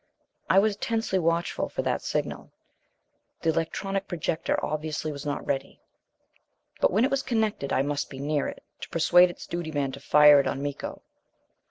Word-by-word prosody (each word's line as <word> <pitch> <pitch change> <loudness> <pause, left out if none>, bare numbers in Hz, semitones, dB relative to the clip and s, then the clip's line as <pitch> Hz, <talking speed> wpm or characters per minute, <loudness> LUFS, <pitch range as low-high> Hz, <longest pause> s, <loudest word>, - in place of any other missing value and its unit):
I - - +4
was 200 +1 +3
tensely 225 -4 -1
watchful 170 0 0
for - - -3
that - - -1
signal. - - -3 0.9
The 165 - +3
electronic 195 +4 -2
projector 165 -1 -1
obviously 155 0 -3
was 145 0 -7
not 145 - -3
ready. 135 -1 -3 1.0
But - - +4
when 215 +6 +3
it - - -1
was 275 0 +1
connected, 220 - -1
I 135 - +2
must 145 0 -2
be 135 - -9
near 145 +1 0
it, - - -8 0.2
to - - -8
persuade 175 +2 +5
its 175 - -9
duty 170 -2 -4
man 140 -3 -1
to 135 - -9
fire 150 +1 +7
it 140 - +1
on 135 - -2
Miko. 145 -1 -5
160 Hz, 175 wpm, -26 LUFS, 145-190 Hz, 1.0 s, fire